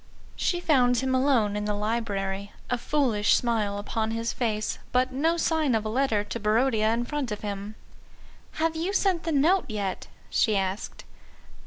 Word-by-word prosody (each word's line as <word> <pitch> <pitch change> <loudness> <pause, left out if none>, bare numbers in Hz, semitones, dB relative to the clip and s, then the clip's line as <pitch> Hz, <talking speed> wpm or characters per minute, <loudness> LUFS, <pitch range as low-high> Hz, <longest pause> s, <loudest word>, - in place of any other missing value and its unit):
She 350 - 0
found 250 -7 +3
him 260 +2 0
alone 255 -6 +2
in 210 0 -2
the 210 0 -1
library, 205 -2 -2 0.2
a 245 - +2
foolish 235 -8 +2
smile 220 -4 0
upon 220 +2 -2
his 230 +1 -2
face, 215 -3 -2
but 255 +1 +2
no 325 +6 +1
sign 315 -6 +1
of 220 -1 -1
a - - -1
letter 225 -3 +1
to 205 +2 -5
Barodia 220 0 +2
in 235 +1 0
front 285 -3 -3
of 210 - -4
him. 205 0 -5 0.8
"Have 320 0 0
you 345 +5 -2
sent 375 -4 +1
the 330 - -1
Note 320 +6 +3
yet?" 200 -3 -3 0.2
she 215 -4 +2
asked. 190 +2 -3
230 Hz, 170 wpm, -26 LUFS, 210-275 Hz, 0.8 s, found